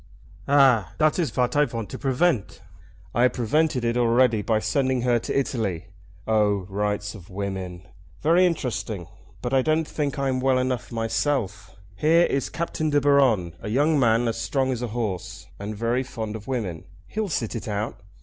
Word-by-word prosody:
"Ah! 130 - +4
dat 155 +3 +2
is 165 - +1
vat 125 +2 0
I 150 0 +5
vant 115 -6 -5
to - - -6
prevent." 135 - 0 0.5
"I 120 - +1
have 125 - +4
prevented 125 +2 +1
it 115 0 +1
already 120 -1 +3
by 110 +1 +1
sending 130 +3 0
her 120 -1 +3
to 135 - -1
Italy. 105 -11 -2 0.4
Oh, 105 -3 +2
rights 105 +1 -2
of 95 -6 -12
women! 95 -2 -5 0.3
Very 170 - +4
interesting; 110 - -3 0.4
but 125 - -2
I 135 - +5
don't 155 +3 +1
think 145 -2 -2
I'm 135 -2 0
well 130 0 +2
enough 125 -2 -2
myself. 115 -2 -2 0.2
Here 160 - +4
is 135 -1 -1
Captain 160 -2 -2
De 145 -1 +3
Baron, 130 - +3
a - - -5
young 145 +6 +2
man 115 -1 +3
as 115 0 -2
strong 130 0 0
as 125 -2 -3
a 125 - -2
horse, 105 -6 -4
and 105 +2 -5
very 115 +3 0
fond 110 -4 -5
of 110 -1 -9
women. 105 -11 -3 0.2
He'll 215 -2 -3
sit 120 -7 -2
it 115 - -5
out." 105 +1 -3
120 Hz, 180 wpm, -24 LUFS, 105-140 Hz, 0.5 s, I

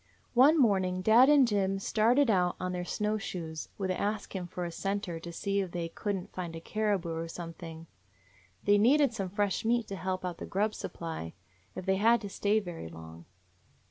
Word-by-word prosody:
"One 275 +6 +6
morning 190 -6 +2
dad 235 +6 +7
and 285 -4 +6
Jim 195 -3 +1
started 230 +6 +3
out 180 -3 +2
on 185 0 -2
their 180 0 -3
snow 210 +4 -1
shoes, 160 -5 -5
with 190 -2 -1
Ask 205 +3 -2
Him 180 -2 -3
for 175 0 -4
a 170 - -4
scenter, 195 -2 -3
to 170 +1 -8
see 200 +4 -1
if 190 -2 -1
they 170 -1 -3
could 205 +4 -3
n't 185 - -7
find 175 -3 -5
a - - -5
caribou 200 -2 -1
or 165 +1 -3
some 165 0 -7
thing. 165 -1 -9 0.8
They 205 0 +4
needed 275 +4 +4
some 195 -5 -3
fresh 205 0 0
meat 235 0 +1
to 200 - -4
help 185 0 -3
out 175 -2 -4
the - - -6
grub 210 +3 0
supply, 160 - -6 0.4
if 185 - -6
they 190 0 +2
had 230 +4 +4
to 205 - -6
stay 205 +2 +1
very 175 - -7
long. 80 0 -11
190 Hz, 205 wpm, -30 LUFS, 175-215 Hz, 0.8 s, dad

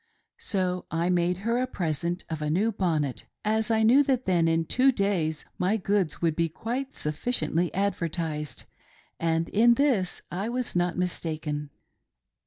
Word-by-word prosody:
So 185 -3 -1
I 170 +2 0
made 175 0 +2
her 235 +1 +2
a 255 - 0
present 170 - -2
of 160 -2 -4
a 150 - -1
new 200 +9 +2
bonnet, 155 - -1 0.2
as 220 +1 +1
I 220 -1 +3
knew 245 +6 +6
that 260 -2 +1
then 170 -3 +3
in 165 0 +2
two 260 +9 +4
days 185 - -1
my 190 +5 +2
goods 195 -5 0
would 165 -2 +2
be 165 0 +1
quite 250 - -4
sufficiently 160 +1 -1
advertised; 165 -6 -2 0.6
and 165 0 +1
in 235 +3 +5
this 235 -10 +1
I 195 +5 -2
was 245 -2 -3
not 175 0 +1
mistaken. 155 -4 -2
180 Hz, 155 wpm, -27 LUFS, 165-220 Hz, 0.6 s, knew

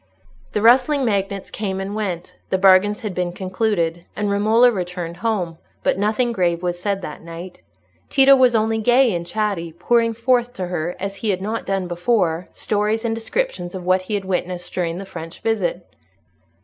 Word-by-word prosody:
The 210 - 0
rustling 260 +4 +5
magnates 200 -3 -1
came 195 -3 -3
and 195 +1 -4
went, 185 -5 -4
the 190 - +2
bargains 195 +2 +5
had 210 -4 -4
been 180 -1 -1
concluded, 185 -3 -1
and 205 -1 -1
Romola 220 +5 +4
returned 180 -4 -4
home; 180 -5 -2 0.2
but - - +2
nothing 220 +4 +1
grave 175 -5 0
was 175 -1 -2
said 195 0 -2
that 150 - -7
night. 170 +2 -9 0.5
Tito 275 0 +7
was 255 -3 +4
only 220 0 +1
gay 245 +1 +4
and 170 -1 -3
chatty, 200 -6 -2
pouring 230 +6 +1
forth 245 +1 +1
to 190 -7 -4
her, 175 -1 -3
as 195 +1 -4
he 220 - -2
had 190 -2 +1
not 215 +4 -4
done 195 -2 -1
before, 175 -1 0
stories 215 +2 -1
and 225 - 0
descriptions 225 - -3
of 180 -1 -6
what 185 +1 +3
he 195 +3 -3
had 200 -1 -3
witnessed 180 -1 -3
during 170 -2 -1
the 195 - -6
French 165 -3 -9
visit. 190 -5 -1
195 Hz, 180 wpm, -21 LUFS, 180-225 Hz, 0.5 s, Tito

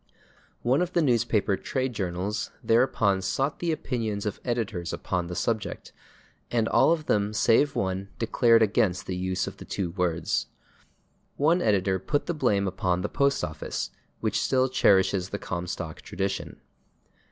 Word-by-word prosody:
One 130 +6 +3
of 180 0 -1
the 170 - +3
newspaper 115 -6 +2
trade 130 +4 -2
journals 95 +1 -2
thereupon 115 -5 +3
sought 135 +9 -1
the 170 -1 0
opinions 115 -9 -2
of 105 - -3
editors 110 -8 -2
upon 90 -2 -2
the 90 - -5
subject, 110 0 -2 0.6
and 115 -2 +1
all - - +4
of 160 -2 0
them 105 -4 +1
save 120 +6 +3
one 95 +1 -2
declared 115 0 +4
against 95 -4 +1
the 95 - -3
use 95 0 -1
of - - -7
the - - -9
two 90 -4 -3
words. 90 -2 -1 0.9
One 165 +5 +3
editor 95 -3 +2
put 145 +10 -1
the 175 - -1
blame 105 -10 +1
upon 90 -1 0
the - - -2
Postoffice, 140 - -1 0.3
which - - 0
still 130 0 +2
cherishes 95 -6 +3
the 100 - -3
Comstock 85 -4 -5
tradition. 95 0 -4
105 Hz, 150 wpm, -27 LUFS, 95-125 Hz, 0.9 s, all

